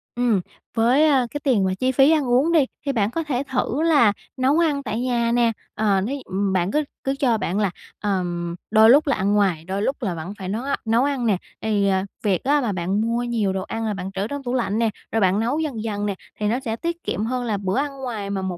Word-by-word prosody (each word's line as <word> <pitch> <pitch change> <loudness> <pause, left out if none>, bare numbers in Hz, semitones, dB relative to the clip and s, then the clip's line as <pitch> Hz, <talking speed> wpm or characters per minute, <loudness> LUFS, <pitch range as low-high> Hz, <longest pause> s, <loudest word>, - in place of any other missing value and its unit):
Ừm, 240 -5 +2 0.3
với, 245 +7 +4
a, 270 -4 +3
cái 290 - -4
tiền 245 -8 +3
mà 190 - +1
chi 255 0 +2
phí 270 +3 +5
ăn 310 -2 +3
uống 255 +7 +3
đi, 315 -5 +4 0.2
thì 280 - +1
bạn 215 -5 0
có 330 +5 -2
thể 275 -4 -1
thử 260 +2 0
là 290 -10 +4 0.2
nấu 265 +5 +3
ăn 300 -4 +1
tại 220 -2 -3
nhà 240 -2 +1
nè. 235 -1 +3 0.2
Ờ, 205 -3 +2
nếu 240 +9 -2
nh - - -6
ừm, 195 +1 -1
bạn 185 0 +1
cứ 300 +5 +1 0.2
cứ 270 0 0
cho 240 -5 +3
bạn 195 -1 -2
là, 200 -3 +1 0.3
ờm, 175 -4 -2 0.2
đôi 220 0 +7
lúc 290 +5 +6
là 280 - +3
ăn 200 +2 0
ngoài, 190 -6 +2
đôi 190 +2 -2
lúc 265 +6 0
là 190 -6 -1
vẫn 165 +4 -6
phải 190 - -5
nấu 220 +5 -2
a 280 +1 0
nấu 225 +3 +3
ăn 275 -3 0
nè. 210 -5 +3 0.2
Thì, 210 -2 +1
ờ, 190 -1 +2 0.2
việc 195 -5 +1
á, 290 +2 +3
mà 235 -5 -1
bạn 190 +3 -1
mua 230 +2 0
nhiều 225 -5 0
đồ 190 - -2
ăn 225 +3 -4
rồi 215 - -1
bạn 190 -1 -5
trữ 195 +1 -2
trong 285 +2 -5
tủ 245 -1 -3
lạnh 230 -4 0
nè, 230 -1 +2 0.2
rồi 225 - +1
bạn 190 +1 +3
nấu 240 +7 0
dần 275 -9 -3
dần 205 -2 -2
nè, 200 -2 -1 0.2
thì 210 - 0
nó 235 +4 +1
sẽ 230 -5 -3
tiết 340 +7 -4
kiệm 215 - -2
hơn 250 +1 -2
là 220 -4 -1
bữa 195 +2 -2
ăn 285 +1 0
ngoài 215 -6 -4
mà 200 -1 -2
1 185 -2 -3
225 Hz, 270 wpm, -22 LUFS, 200-265 Hz, 0.3 s, đôi